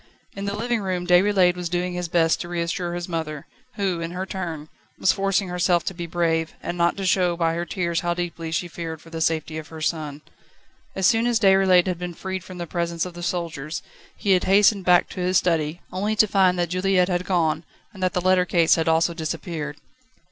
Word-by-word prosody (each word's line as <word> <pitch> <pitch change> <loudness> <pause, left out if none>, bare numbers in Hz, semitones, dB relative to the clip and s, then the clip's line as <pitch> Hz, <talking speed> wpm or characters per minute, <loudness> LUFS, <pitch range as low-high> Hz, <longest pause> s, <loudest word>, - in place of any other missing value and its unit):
In 200 0 -5
the 200 0 -2
living 235 0 -1
room 185 -2 -2
Déroulède 180 0 +4
was 180 -1 -4
doing 180 +1 -1
his 180 0 -3
best 165 -1 +2
to 175 - -6
reassure 175 0 -2
his 175 0 -4
mother, 160 -4 -4 0.3
who, 190 -4 -1
in 165 - -3
her 180 +2 -4
turn, 170 -6 -5 0.3
was - - +3
forcing 195 0 0
herself 175 -1 +2
to - - -2
be 170 -1 -6
brave, 165 -1 0
and 175 - -3
not 170 +1 +1
to 195 - -3
show 180 -2 +2
by 165 -1 +1
her 170 +1 -2
tears 170 -4 -1
how 175 0 -1
deeply 170 -2 -4
she 175 +2 -1
feared 165 -1 -6
for 165 - -16
the 165 -1 -5
safety 160 -1 0
of 155 - -9
her 160 - -10
son. 155 -2 -3 0.7
As 190 - 0
soon 230 +3 +4
as 235 -2 +2
Déroulède 190 -3 +5
had 180 -2 -2
been 175 -1 -5
freed 190 0 -5
from 185 -1 -10
the 175 - -4
presence 170 0 -2
of 180 - -7
the 175 - -9
soldiers, 165 -3 -3 0.3
he 200 - 0
had 185 -1 +3
hastened 200 0 +4
back 180 -1 +5
to - - -8
his 180 +1 +2
study, 165 -2 0
only 205 +4 -1
to 215 - +5
find 190 -3 +3
that 175 -1 0
Juliette 185 0 +2
had 180 -1 -1
gone, 165 -4 +1 0.3
and 190 - -11
that 185 -1 +1
the 180 - 0
letter 185 0 +4
case 170 -2 +3
had 165 -1 +1
also 165 +1 +3
disappeared. 160 -2 -4
175 Hz, 220 wpm, -23 LUFS, 165-185 Hz, 0.7 s, Déroulède